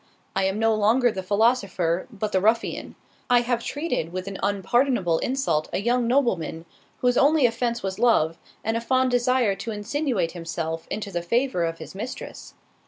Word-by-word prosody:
I 195 Hz, 0 st, +2 dB
am 190 Hz, +1 st, 0 dB
no 225 Hz, 0 st, +3 dB
longer 225 Hz, +4 st, +3 dB
the 190 Hz, -, -4 dB
philosopher, 195 Hz, -4 st, +1 dB
but 215 Hz, -1 st, -3 dB
the 190 Hz, -, +2 dB
ruffian—I 230 Hz, +2 st, 0 dB
have 240 Hz, -1 st, -1 dB
treated 290 Hz, -, -2 dB
with 185 Hz, +1 st, -4 dB
an 195 Hz, -1 st, -6 dB
unpardonable 200 Hz, -2 st, +1 dB
insult 255 Hz, -, 0 dB
a -, -, -1 dB
young 240 Hz, +3 st, +1 dB
nobleman, 190 Hz, -, 0 dB, 0.4 s
whose 245 Hz, 0 st, +2 dB
only 290 Hz, -1 st, +4 dB
offence 235 Hz, -1 st, 0 dB
was 190 Hz, -1 st, -3 dB
love, 165 Hz, -9 st, +3 dB, 0.2 s
and 225 Hz, +1 st, -1 dB
a 230 Hz, -, -1 dB
fond 255 Hz, +2 st, +2 dB
desire 245 Hz, -3 st, +2 dB
to 230 Hz, -, -6 dB
insinuate 220 Hz, -, -1 dB
himself 165 Hz, -1 st, -4 dB
into 205 Hz, -1 st, -4 dB
the 175 Hz, -2 st, -2 dB
favour 235 Hz, -1 st, +1 dB
of 165 Hz, 0 st, -3 dB
his -, -, -10 dB
mistress. 250 Hz, +7 st, -7 dB
220 Hz, 170 wpm, -24 LUFS, 185-245 Hz, 0.4 s, only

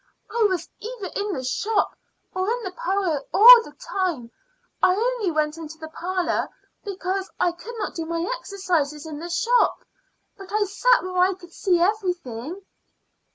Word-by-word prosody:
"I 465 Hz, -1 st, +1 dB
was 360 Hz, -3 st, -2 dB
either 440 Hz, -4 st, -6 dB
in 410 Hz, -1 st, -1 dB
the 260 Hz, -, -4 dB
shop 405 Hz, -, 0 dB, 0.4 s
or 370 Hz, +2 st, -1 dB
in 480 Hz, +1 st, -1 dB
the 375 Hz, -, -4 dB
parlor 380 Hz, -, -1 dB
all 475 Hz, +3 st, +10 dB
the 295 Hz, -, -12 dB
time. 335 Hz, -12 st, -3 dB, 0.5 s
I 370 Hz, 0 st, +5 dB
only 465 Hz, -2 st, 0 dB
went 310 Hz, 0 st, -1 dB
into 320 Hz, 0 st, -8 dB
the 315 Hz, -1 st, -8 dB
parlor 360 Hz, +2 st, -1 dB, 0.3 s
because 385 Hz, -1 st, -3 dB
I 355 Hz, -, +3 dB
could 430 Hz, +8 st, -10 dB
not 420 Hz, -, -3 dB
do 330 Hz, -1 st, -5 dB
my 335 Hz, +1 st, -2 dB
exercises 335 Hz, -, -2 dB
in 305 Hz, -2 st, -7 dB
the 340 Hz, +2 st, -6 dB
shop. 470 Hz, +8 st, +2 dB, 0.6 s
But 390 Hz, -1 st, -11 dB
I 425 Hz, 0 st, +2 dB
sat -, -, +3 dB
where 365 Hz, 0 st, -2 dB
I 370 Hz, +1 st, +4 dB
could 350 Hz, -2 st, -15 dB
see 360 Hz, -3 st, +1 dB
everything." 355 Hz, -, -2 dB
370 Hz, 165 wpm, -24 LUFS, 330-410 Hz, 0.6 s, all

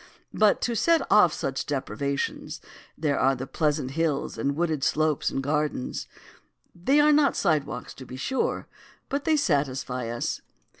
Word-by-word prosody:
But 215 Hz, -1 st, +3 dB
to 235 Hz, -, 0 dB
set 330 Hz, +8 st, +3 dB
off 200 Hz, -5 st, +6 dB
such 135 Hz, -2 st, -3 dB
deprivations 140 Hz, 0 st, -3 dB, 0.4 s
there 150 Hz, -3 st, 0 dB
are 135 Hz, +1 st, +3 dB
pleasant 145 Hz, +1 st, -1 dB
hills 155 Hz, -1 st, -1 dB
and 140 Hz, 0 st, -1 dB
wooded 160 Hz, -3 st, -1 dB
slopes 155 Hz, 0 st, +1 dB
and 135 Hz, -, -3 dB
gardens. 150 Hz, -2 st, -2 dB, 0.7 s
They 265 Hz, +12 st, +2 dB
are 300 Hz, +1 st, +6 dB
not 295 Hz, -1 st, +4 dB
sidewalks, 150 Hz, -4 st, -1 dB
to 130 Hz, -, -11 dB
be 130 Hz, -, -8 dB
sure, 260 Hz, -, -1 dB, 0.4 s
but 280 Hz, +1 st, -2 dB
they 315 Hz, -1 st, +3 dB
satisfy 135 Hz, -, 0 dB
us." 120 Hz, 0 st, -3 dB
150 Hz, 145 wpm, -26 LUFS, 135-195 Hz, 0.7 s, off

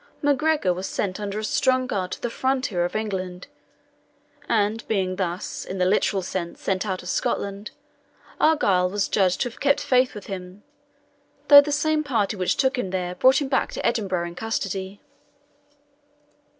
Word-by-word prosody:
MacGregor 290 Hz, -, +2 dB
was 185 Hz, +2 st, -5 dB
sent 190 Hz, 0 st, -3 dB
under 205 Hz, 0 st, -4 dB
a 215 Hz, -, -3 dB
strong 255 Hz, +3 st, +2 dB
guard 190 Hz, -6 st, -3 dB
to -, -, -8 dB
the 240 Hz, -, -2 dB
frontier 255 Hz, -9 st, 0 dB
of 175 Hz, -, -5 dB
England, 185 Hz, -4 st, -3 dB, 1.0 s
and 215 Hz, +1 st, +1 dB
being 185 Hz, -3 st, -1 dB
thus, 180 Hz, 0 st, -3 dB
in 190 Hz, -, -6 dB
the 180 Hz, -, +2 dB
literal 195 Hz, 0 st, +1 dB
sense, 175 Hz, -1 st, -4 dB
sent 190 Hz, +1 st, -1 dB
out 185 Hz, -2 st, -3 dB
of -, -, -9 dB
Scotland, 200 Hz, +2 st, -2 dB, 0.7 s
Argyle 195 Hz, -13 st, +3 dB
was 200 Hz, +1 st, -1 dB
judged 185 Hz, -3 st, +1 dB
to 245 Hz, -, 0 dB
have 235 Hz, -, -16 dB
kept 280 Hz, 0 st, +3 dB
faith 255 Hz, -2 st, +2 dB
with 205 Hz, -, -8 dB
him, 185 Hz, 0 st, -8 dB, 0.9 s
though 285 Hz, -1 st, +11 dB
the 295 Hz, +1 st, -4 dB
same 305 Hz, +1 st, +1 dB
party 225 Hz, -8 st, 0 dB
which 185 Hz, -2 st, 0 dB
took 265 Hz, -1 st, +1 dB
him 195 Hz, -, -2 dB
there 180 Hz, -1 st, -2 dB
brought 260 Hz, +9 st, +4 dB
him -, -, -3 dB
back 265 Hz, 0 st, 0 dB
to -, -, -4 dB
Edinburgh 190 Hz, -7 st, 0 dB
in -, -, -10 dB
custody. 195 Hz, -1 st, -4 dB
200 Hz, 170 wpm, -24 LUFS, 185-255 Hz, 1.0 s, though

